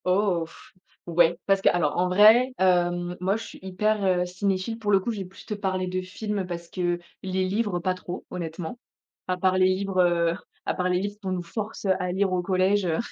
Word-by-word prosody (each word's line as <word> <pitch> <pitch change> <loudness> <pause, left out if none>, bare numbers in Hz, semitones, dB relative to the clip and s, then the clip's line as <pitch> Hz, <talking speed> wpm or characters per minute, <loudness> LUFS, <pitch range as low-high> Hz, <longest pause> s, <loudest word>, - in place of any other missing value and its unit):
Oh 185 -2 +2
f - - -17 0.3
ouais, 170 0 +3
parce 195 -1 +3
qu'alors, 165 -6 +2
en 180 +1 +2
vrai, 220 +7 +6
hem, 175 -1 +2
moi, 190 +3 +1
je 225 - -7
suis - - -11
hyper, 205 +3 0
heu, 180 -2 +2
cinéphile. 190 +4 -2
Pour 210 -2 -1
le 195 - +6
coup, 215 +5 -3
je 215 - -5
vais 190 - -4
plus 185 +2 -14
te - - -4
parler 190 -2 -2
de 185 0 -2
films 200 +1 -4
parce 170 -1 -6
que 175 -2 -1 0.2
les 190 0 -1
livres, 205 -2 0
pas 185 +1 0
trop, 185 -1 -7
honnêtement, 170 +4 -5 0.5
à 185 0 0
part 185 0 +2
les 185 0 +5
livres, 185 0 +1
heu, 170 -1 +3 0.3
à - - 0
part 180 0 -1
les 180 0 +2
livres 205 +2 -4
qu'on 190 -2 -3
nous 180 -1 -3
force 210 +5 -6
à 185 -1 +1
lire 190 0 +1
au 180 - +1
collège, 190 +2 +2
heu 165 -2 0
185 Hz, 220 wpm, -26 LUFS, 180-200 Hz, 0.5 s, vrai